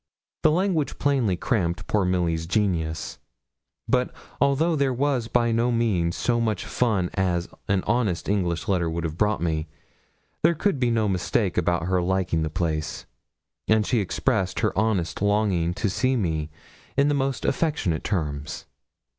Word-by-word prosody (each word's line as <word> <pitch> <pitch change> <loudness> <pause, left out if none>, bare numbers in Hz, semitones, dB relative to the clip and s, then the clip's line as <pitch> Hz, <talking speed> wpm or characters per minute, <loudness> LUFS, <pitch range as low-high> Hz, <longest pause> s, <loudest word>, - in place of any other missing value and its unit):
The - - +5
language 170 -2 0
plainly 130 -10 +1
cramped 90 -6 -1
poor 105 -3 +1
Milly's 85 -3 0
genius; 85 -5 -1 0.7
but 125 0 +1 0.3
although 145 +4 +3
there 140 -3 +1
was 130 -3 0
by 120 0 +2
no 115 +2 +2
means 100 -8 +1
so 120 -1 +1
much 110 -5 -1
fun 105 -8 0
as 90 -3 0 0.2
an 95 -2 +1
honest 105 -6 0
English 90 -4 0
letter 90 -4 +1
would 85 +1 -3
have 80 -2 -3
brought 105 0 +1
me, 80 -1 -1 0.7
there 170 - +4
could 180 -3 0
be 125 -2 +2
no 110 -2 +1
mistake 95 +1 0
about 85 -1 +1
her 90 +1 +1
liking 90 -2 0
the 80 - -1
place, 80 -2 -2 0.6
and 110 -1 +3
she 120 - +1
expressed 95 -1 0
her - - +1
honest 100 -6 0
longing 100 -5 +2
to 105 - -1
see 130 +7 +1
me 80 -8 -1 0.5
in 140 +1 +4
the 145 - +2
most 135 -1 -1
affectionate 135 - 0
terms. 75 -6 -3
100 Hz, 155 wpm, -25 LUFS, 85-120 Hz, 0.7 s, The